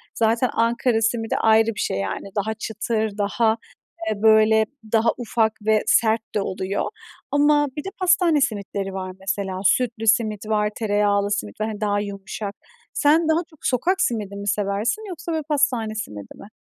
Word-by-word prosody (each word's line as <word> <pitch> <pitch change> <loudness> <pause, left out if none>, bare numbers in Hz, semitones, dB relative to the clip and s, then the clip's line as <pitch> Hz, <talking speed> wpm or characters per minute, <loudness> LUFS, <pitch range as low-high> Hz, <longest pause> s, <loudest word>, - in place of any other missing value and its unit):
Zaten 230 +2 +2
Ankara 230 0 +1
simidi 225 0 0
ayrı 220 0 +3
bir - - -7
şey 95 - -1
yani. 100 - -4
Daha 215 +2 -1
çıtır, 220 -1 -3
daha, 220 +2 +1 0.5
eee, 210 -1 -3
böyle 220 0 +5 0.3
daha 225 0 +3
ufak 225 -2 0
ve 220 -1 +3
sert 225 -1 +3
de 205 - +2
oluyor 190 +1 -2 0.5
ama 290 0 +4
bir 295 - -3
de - - -4
pastane 350 -5 +3
simitleri 200 -5 -2
var 185 -1 -5
mesela. 190 -1 -3
Sütlü 230 -1 +1
simit 215 -1 +2
var, 210 -1 +1
tereyağlı 205 -2 +1
simit 205 +1 -3
var, 215 - 0
hani 215 -1 -6
daha 205 -1 +1
yumuşak. 200 0 -6 0.4
Sen 315 +2 +3
daha 315 - +3
çok 315 -3 -21
sokak 355 +10 +1
simidi 210 - -1
mi 200 0 -6
seversin 205 - -1
yoksa 340 -1 -6
böyle 315 -1 -1
pastane 270 -7 0
simidi 105 - -7
mi? - - -12
220 Hz, 165 wpm, -22 LUFS, 205-240 Hz, 0.5 s, böyle